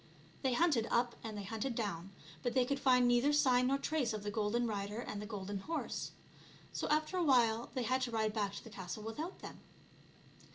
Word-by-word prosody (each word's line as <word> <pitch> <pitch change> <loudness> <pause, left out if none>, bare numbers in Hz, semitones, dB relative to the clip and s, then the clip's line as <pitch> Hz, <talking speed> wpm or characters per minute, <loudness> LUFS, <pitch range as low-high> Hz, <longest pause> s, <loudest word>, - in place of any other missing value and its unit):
They 265 -2 +1
hunted 275 -6 +3
up 240 0 +2
and 220 -2 -5
they 205 - -4
hunted 225 +5 -3
down, 195 -6 -3 0.3
but 245 - -2
they 255 -1 +4
could 280 +2 -1
find 250 -3 +5
neither 245 +4 +4
sign 255 -4 +4
nor 275 +1 +3
trace 275 -5 0
of 210 -1 -4
the 205 - -2
golden 220 +2 +1
rider 205 -1 -3
and 210 -4 -4
the 210 - -6
golden 200 -2 -4
horse. 320 +11 -3 0.6
So - - -2
after 310 +4 +1
a 360 - +2
while 235 -5 +4
they 255 - 0
had 255 +3 +1
to 250 -2 -1
ride 220 -1 0
back 205 -3 -1
to - - -7
the 225 - -11
castle 190 +1 -6
without 300 - -5
them. - - -8
235 Hz, 210 wpm, -35 LUFS, 210-265 Hz, 0.6 s, find